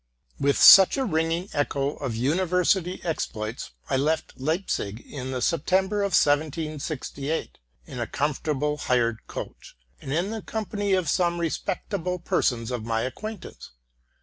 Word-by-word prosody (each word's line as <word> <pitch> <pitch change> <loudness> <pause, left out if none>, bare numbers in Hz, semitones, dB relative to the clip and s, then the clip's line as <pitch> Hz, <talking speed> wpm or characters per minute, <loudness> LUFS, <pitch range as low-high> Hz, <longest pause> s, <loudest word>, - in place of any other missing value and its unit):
With 140 0 +2
such 190 +6 +9
a 265 - 0
ringing 165 -1 0
echo 140 -1 0
of 130 -5 -4
university 180 - +1
exploits, 115 -9 -4 0.2
I 135 - +1
left 155 +2 -1
Leip 160 +8 -1
zig 100 +2 -2
in 130 -2 -7
the 130 -2 -2
September 190 +5 +1
of 200 -2 -1
1768, 155 -1 -1 0.3
in 125 - -8
a 120 - -2
comfortable 150 0 -1
hired 120 -5 0
coach, - - -8 0.2
and 135 - -6
in 175 +7 0
the 225 -1 -4
company 205 -2 -2
of 185 -3 +1
some 175 +2 +1
respectable 180 +2 -2
persons 120 -8 0
of 120 -3 -3
my 115 0 -1
ac 130 - -4
quaintance. 215 - -8
155 Hz, 145 wpm, -25 LUFS, 135-180 Hz, 0.3 s, such